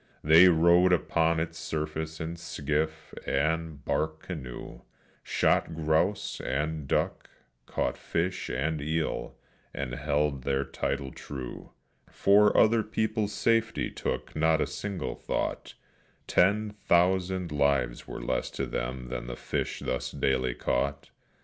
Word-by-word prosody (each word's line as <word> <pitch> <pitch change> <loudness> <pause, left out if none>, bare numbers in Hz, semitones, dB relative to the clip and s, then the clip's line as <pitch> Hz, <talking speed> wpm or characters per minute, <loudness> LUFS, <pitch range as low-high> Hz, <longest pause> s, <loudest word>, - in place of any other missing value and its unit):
They 80 +4 +8
rode 85 +2 +5
upon 85 -1 +2
its 80 0 -3
surface 80 0 -3
in 80 +1 -4
skiff, 80 -2 -3
and 80 +1 -1
bark 80 0 -1
canoe, 70 -9 -7 0.4
Shot 80 - +1
grouse 80 +6 0
and 75 +1 -2
duck, - - -1 0.4
caught - - -1
fish 90 +3 -2
and 75 +5 -1
eel, 80 +2 -2 0.4
and 70 -3 -3
held 70 +1 0
their 70 +1 0
title 70 -1 -3
true; 65 -4 -8 0.4
For 105 +1 +4
other 115 +1 +5
people's 110 0 -1
safety 115 -1 +1
took - - -4
not 80 0 +3
a - - +2
single 100 -3 -4
thought - - -3 0.5
Ten 105 +3 +3
thousand 90 -2 +1
lives 70 -4 +1
were - - -6
less - - -1
to - - 0
them 60 +1 -4
than 60 -1 -4
fish - - -3
thus 65 -1 -1
daily 65 -2 0
caught. 70 +3 -1
80 Hz, 125 wpm, -28 LUFS, 70-90 Hz, 0.5 s, They